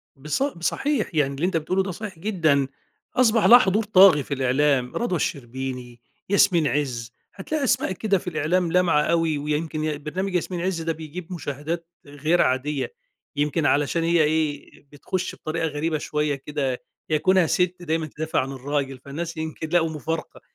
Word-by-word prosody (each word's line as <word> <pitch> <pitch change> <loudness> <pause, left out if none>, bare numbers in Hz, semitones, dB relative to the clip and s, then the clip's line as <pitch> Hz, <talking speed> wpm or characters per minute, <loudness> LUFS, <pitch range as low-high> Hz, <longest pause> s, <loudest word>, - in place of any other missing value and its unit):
بِصَ 150 - -2
بصحيح 275 - -1
يعني 140 -2 +2
اللي 150 +6 -1
أنت 185 -2 +1
بتقوله 185 +5 0
ده 190 - -4
صحيح 190 -1 -7
جدًا، 160 -8 +2 0.5
أصبَح 230 -3 +4
لها 240 - +10
حضور 210 0 +2
طاغي 190 -8 +6
في 140 - -4
الإعلام 130 -1 +1
رضوى 235 -7 0
الشربيني، 125 -3 -4 0.3
ياسمين 180 -6 +4
عز 125 -4 -2 0.2
هتلاقي 285 +10 -3
أسماء 255 -4 +1
كده 195 +1 +1
في 180 - -10
الإعلام 170 +2 0
لامعة 175 -4 +3
أوي، 165 -2 +1
ويمْكِن 150 +2 -2
ي 155 -1 -1
برنامج 180 +6 -4
ياسمين 180 0 -1
عز 180 -2 -1
ده 165 0 -1
بيجيب 160 +3 -8
مشاهدات 160 +1 -4 0.2
غير 150 +4 +1
عادية، 135 - 0 0.4
يمْكِن 150 +1 0
علشان 145 +4 +2
هي 165 -1 +3
إيه 150 -1 -1 0.2
بتخش 185 +6 -4
بطريقة 160 +1 -2
غريبة 155 +2 -1
شوية 150 -1 -1
كده، 135 -2 -3 0.3
هي 155 - +2
كُونها 185 0 +4
سِت 180 +2 +1
دايمًا 160 -1 -1
تدافع 160 +1 -2
عن 135 +1 -4
الراجل، 135 0 -3
فالناس 160 +5 -6
يمْكِن 160 0 -5
لقوا 165 -1 +2
مفارقة، 160 +1 -5
160 Hz, 165 wpm, -24 LUFS, 145-180 Hz, 0.5 s, لها